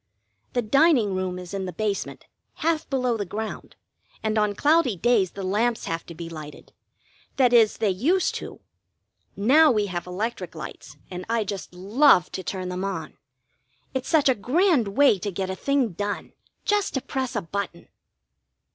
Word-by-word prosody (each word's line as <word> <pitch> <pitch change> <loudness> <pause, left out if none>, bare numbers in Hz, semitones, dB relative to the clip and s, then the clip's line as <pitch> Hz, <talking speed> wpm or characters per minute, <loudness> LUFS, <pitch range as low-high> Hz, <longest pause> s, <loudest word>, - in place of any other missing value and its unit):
The 245 - +1
dining 255 - +4
room 185 -1 -2
is 180 0 -8
in 195 -1 -2
the 180 - -4
basement, 210 0 -3 0.4
half 325 -1 +1
below 250 -4 0
the 205 - -2
ground, 215 +3 -6 0.5
and 220 0 0
on 210 -1 +1
cloudy 295 -5 +3
days 200 -2 +2
the 200 - -6
lamps 220 +5 0
have 165 0 -4
to 170 - -9
be 170 +1 -7
lighted 155 -3 -10 0.6
that 250 -3 +3
is, 225 -3 +5
they 210 -3 +1
used 310 - +1
to. - - -7 0.7
Now 285 +10 +5
we 210 -3 +1
have 180 -2 -4
electric 185 -1 -4
lights, 155 -2 -9
and 180 0 -5
I 230 -1 +1
just 195 -3 -6
love 195 +1 +4
to - - -4
turn 185 0 -4
them 180 +1 -3
on. 175 -6 -4 0.8
It's 260 -1 -3
such 310 -4 +4
a 260 - +5
grand 265 - +2
way 275 -8 +5
to 205 - -3
get 190 0 -3
a - - -3
thing 275 +1 +1
done, 205 +3 -4 0.3
just 415 -5 +1
to 265 - 0
press 260 -1 -3
a 210 - 0
button. 180 0 -5
210 Hz, 175 wpm, -25 LUFS, 185-255 Hz, 0.8 s, is